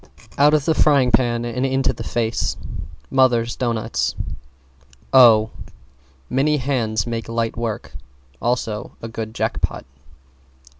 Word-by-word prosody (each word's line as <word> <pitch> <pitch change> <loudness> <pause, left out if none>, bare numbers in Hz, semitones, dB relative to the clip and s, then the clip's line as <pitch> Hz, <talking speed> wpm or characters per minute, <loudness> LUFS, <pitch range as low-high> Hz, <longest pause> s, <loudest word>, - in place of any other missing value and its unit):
Out 150 +2 +5
of 150 -2 0
the 160 - +3
frying 140 -5 +4
pan 120 0 +2
into 130 +3 0
the - - -10
face 115 -1 -1 0.5
Mothers' 120 -3 +3
doughnuts. 115 -3 -1 1.0
O 110 -4 +7 0.8
Many 150 +3 +1
hands 120 -6 -1
make 115 -2 -4
light 115 0 -1
work 115 -2 -4 0.5
also 115 -3 -2
a - - -3
good 110 -1 -6
Jackpot. - - -2
120 Hz, 110 wpm, -21 LUFS, 115-130 Hz, 1.0 s, O